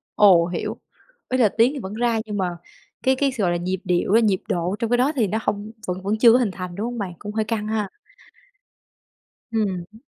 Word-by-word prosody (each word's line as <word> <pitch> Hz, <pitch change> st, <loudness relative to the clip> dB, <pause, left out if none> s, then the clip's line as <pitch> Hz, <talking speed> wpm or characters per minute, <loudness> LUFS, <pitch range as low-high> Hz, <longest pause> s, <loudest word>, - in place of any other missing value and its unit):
Ồ, 180 Hz, -5 st, +6 dB
hiểu, 175 Hz, -, -4 dB, 0.5 s
ý 255 Hz, -, +1 dB
là 225 Hz, -5 st, +4 dB
tiếng 235 Hz, +7 st, +3 dB
thì 280 Hz, -, -5 dB
vẫn 190 Hz, -1 st, -6 dB
ra 230 Hz, 0 st, +1 dB
nhưng 210 Hz, -1 st, -4 dB
mà 180 Hz, -2 st, -2 dB, 0.5 s
cái 265 Hz, 0 st, +3 dB
cái 275 Hz, 0 st, +1 dB
sao, 230 Hz, -6 st, -2 dB
gọi 175 Hz, -, +2 dB
là, 175 Hz, -, +1 dB
nhịp 185 Hz, +1 st, -2 dB
điệu 180 Hz, +1 st, +1 dB
á, 225 Hz, -, +7 dB
nhịp 200 Hz, -4 st, +2 dB
độ 175 Hz, +2 st, 0 dB
trong 230 Hz, -, -1 dB
cái 245 Hz, -, +3 dB
đó 265 Hz, +4 st, +3 dB
thì 230 Hz, -6 st, +2 dB
nó 215 Hz, +4 st, -1 dB
hông 205 Hz, +1 st, -3 dB, 0.2 s
vẫn 180 Hz, +1 st, -3 dB
vẫn 205 Hz, +3 st, -1 dB
chưa 230 Hz, 0 st, +7 dB
có -, -, +6 dB
hình 230 Hz, -6 st, +1 dB
thành, 180 Hz, -1 st, -7 dB
đúng 210 Hz, +4 st, -3 dB
hông 240 Hz, 0 st, -4 dB
bạn? 195 Hz, -4 st, -4 dB
Cũng 210 Hz, 0 st, -7 dB
hơi 220 Hz, 0 st, +1 dB
căng 215 Hz, -1 st, -2 dB
ha. 215 Hz, -2 st, -1 dB, 1.6 s
Ừm 220 Hz, -2 st, +1 dB
hứm. 190 Hz, +5 st, -7 dB
210 Hz, 240 wpm, -23 LUFS, 185-230 Hz, 1.6 s, á